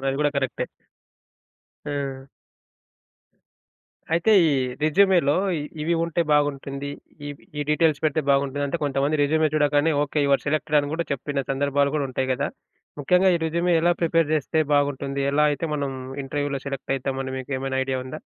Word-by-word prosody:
అది 135 0 0
కూడా 150 0 +2
కరెక్టే. 135 -3 -2 1.2
ఆ! 140 -2 -4 1.9
అయితే 170 +6 +3
ఈ - - +3 0.3
రెజ్యూ‌మే‌లో 170 -1 +4 0.2
ఇ - - -4 0.2
ఇవి 170 +2 +1
ఉంటే 170 0 0
బాగుంటుంది. 140 -1 0 0.4
ఇవి 145 - -10
ఈ - - -1
డీటెయిల్స్ 150 -1 +2
పెడితే 155 0 +2
బాగుంటుంది 140 +1 +1
అంటే 165 +4 -2
కొంతమంది 140 +2 0
రెజ్యూమే 155 +2 +2
చూడగానే 145 +1 +3
"ఓకే. 150 +1 -2
యూ 140 - +1
ఆర్ - - -19
సెలెక్టెడ్" 150 0 +1
అని 145 0 -5
కూడా 170 +1 -1
చెప్పిన 140 +1 -2
సందర్భాలు 140 +1 +1
కూడా 145 -2 0
ఉంటయి 130 0 -2
కదా! 140 +2 -1 0.5
ముఖ్యంగా 180 +6 +3
ఈ - - +3
రెజ్యూమే 170 +2 +1
ఎలా 175 +2 +3
ప్రిపేర్ 165 -2 +2
చేస్తే 155 +1 0
బాగుంటుంది? 140 -1 0
ఎలా 150 +1 +3
అయితే 145 +2 -2
మనం 140 -2 -2 0.3
ఇంటర్‌వ్యూ‌లో 145 0 -2
సెలెక్ట్ 135 -1 -3
అయితాం 135 0 -3
అని 130 - -5
మీకు 130 +2 -6
ఏమైనా 135 0 -2
ఐడియా 130 -1 -2
ఉందా? 130 - -7
145 Hz, 160 wpm, -24 LUFS, 140-155 Hz, 1.9 s, రెజ్యూ‌మే‌లో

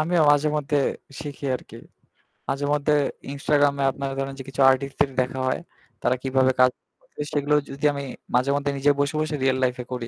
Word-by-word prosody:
আমিও 165 +1 +2
মাঝেমধ্যে 145 0 +2 0.4
শিখি 145 -2 -7
আরকি। - - -14 0.7
মাঝেমধ্যে 145 +1 +1 0.4
ইনস্টাগ্রাম 145 0 +2
এ - - +2
আপনার 135 +1 -4
ধরেন 135 0 -3
যে - - -5
কিছু 135 +1 -3
আর্টিস্ট 135 +1 0
দের 140 - +3
দেখা 130 +1 -3
হয় 130 - 0 0.4
তারা 125 - +2
কিভাবে 130 0 +3
কাজ 130 0 +6
গুলো - - -37
করে - - -5
সেগুলো 145 0 +1 0.2
যদি 140 +2 -4
আমি 140 0 -4 0.3
মাঝেমধ্যে 140 +3 +1
নিজে 145 +2 +4
বসে, 145 +2 0
বসে 155 0 -1
রিয়াল 130 -1 +3
লাইফ 125 -1 +1
এ - - -20
করি। 120 -2 -4
140 Hz, 185 wpm, -24 LUFS, 135-145 Hz, 0.7 s, কাজ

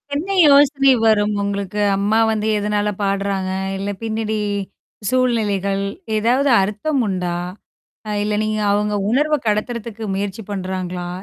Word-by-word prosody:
என்ன 360 +7 -2
யோசனை 280 -1 +5
வரும். 210 -1 +3
உங்களுக்கு 200 0 -3 0.2
அம்மா 205 +3 +1
வந்து 215 -1 -1
எதனால 210 0 0
பாடுறாங்க? 195 -1 -1 0.3
இல்ல 200 +1 -3
பின்னாடி 220 -1 -2 0.7
சூழ்நிலைகள். 205 -6 0 0.3
ஏதாவது 250 +6 +2
அர்த்தம் 215 +9 -1
உண்டா? 180 -3 -2 0.8
அ - - -3
இல்ல 210 0 -1
நீங்க 215 0 -1
அவங்க 210 +1 0 0.2
உணர்வ 300 +5 +2
கடத்துறதுக்கு 225 +1 -2
முயற்சி 200 +2 -3
பண்றாங்களா? 185 -2 -4
210 Hz, 120 wpm, -20 LUFS, 200-230 Hz, 0.8 s, யோசனை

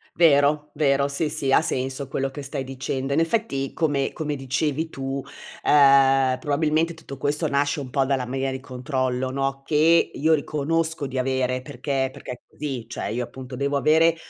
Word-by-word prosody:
Vero, 150 -2 +4
vero, 140 -2 +2
sì 145 +2 -1
sì, 140 -2 0
ha - - +6
senso 135 -2 -2
quello 135 0 -2
che 145 - -7
stai 135 -1 -4
dicendo. 135 +1 -3
In 145 - +2
effetti, 165 -6 -1
come 145 -4 0
come 150 -3 -3
dicevi 145 +4 -1
tu, 135 -1 -4 0.4
ehm, 135 -2 +5
probabilmente 155 +4 +1
tutto 140 -4 -10
questo 150 +4 0
nasce 145 +1 0
un 130 - -7
po' 135 +1 +2
dalla 130 -2 0
mania 135 +2 -2
del 130 - -4
controllo, 130 -1 -2
no, 135 0 -2
che 160 +3 +3
io 160 +2 +2
riconosco 155 +1 0
di 130 0 -3
avere, 130 -1 0
perché 135 -1 -2
perché - - -9
è 125 - -7
così; 135 -6 -5
cioè - - -5
io 115 +4 -2
appunto 130 +1 -9
devo 140 +2 0
avere 160 +3 +4
140 Hz, 175 wpm, -24 LUFS, 130-150 Hz, 0.4 s, ha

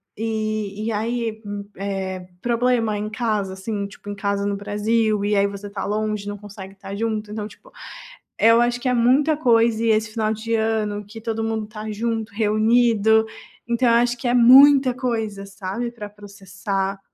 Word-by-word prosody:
e 215 -1 -3
e 230 - -1
aí 225 0 -2
m 205 0 -6
eh, 190 -2 -4
problema 235 -2 +1
em 210 +1 -3
casa, 215 -4 -2
assim, 200 +1 -4
tipo 200 - -16
em 205 - -3
casa 200 0 -1
no 200 0 -1
Brasil, 210 +1 0
e 210 0 +1
aí 200 0 +3
você 200 0 -8
está 200 -1 -5
longe, 210 -1 -2
não 205 0 -4
consegue 200 -1 -11
estar 195 0 -8
junto. 215 -1 -3
Então, 210 -1 -4
tipo, - - -18 0.7
eu 230 +1 +5
acho 240 0 +1
que 255 - -3
é 250 - +2
muita 265 +6 +3
coisa, 230 -5 +2
e 230 - +1
esse 220 0 +1
final 215 -1 -1
de 220 +1 -3
ano, 220 -2 0
que 210 +3 -11
todo 225 0 -3
mundo 220 -1 -2
tá 215 0 -8
junto, 225 0 -3
reunido. 220 +1 +3 0.4
Então 235 +1 +1
eu 230 - +5
acho 240 +1 +2
que 245 - -4
é 240 - +2
muita 265 +2 +7
coisa, 225 -6 -3
sabe, 200 +4 -4
pra 225 -3 -8
processar. 195 -1 -5
215 Hz, 180 wpm, -22 LUFS, 205-230 Hz, 0.7 s, muita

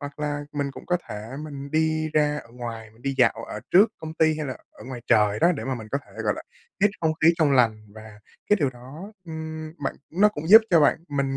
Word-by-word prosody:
Hoặc 145 0 -8
là 145 -1 -3
mình 140 -1 -2
cũng - - -12
có 180 - +2
thể 105 +2 -7
mình 140 -2 -8
đi 155 0 +1
ra 150 -1 +2
ở 115 - -12
ngoài, 115 -2 -7
mình 110 +2 -23
đi 135 +1 -2
dạo - - +5 0.2
ở - - -6
trước 210 +5 +6
công 160 0 -7
ty, 160 -1 +2
hay 150 - -3
là 130 - -5
ở - - -14
ngoài 125 -2 -7
trời 105 -1 +3
đó, 170 +2 +5
để 150 - -5
mà 135 -1 -2
mình 110 -3 -8
có 140 - +1
thể, - - -19
gọi - - +2
là, - - -7 0.4
hít 210 - +5
không 160 -1 +2
khí 160 - +7
trong 155 -4 +3
lành, 110 -5 +2
và 110 -1 -12 0.3
cái 210 - +6
điều 145 -6 +1
đó, 140 - -11
ưm, 160 -1 -6
bạn - - -2
nó 195 +6 +4
cũng 160 -7 -6
giúp 220 +2 +10
cho 170 - +6
bạn 145 - +4
mình 140 -1 -1
145 Hz, 255 wpm, -25 LUFS, 125-160 Hz, 0.4 s, giúp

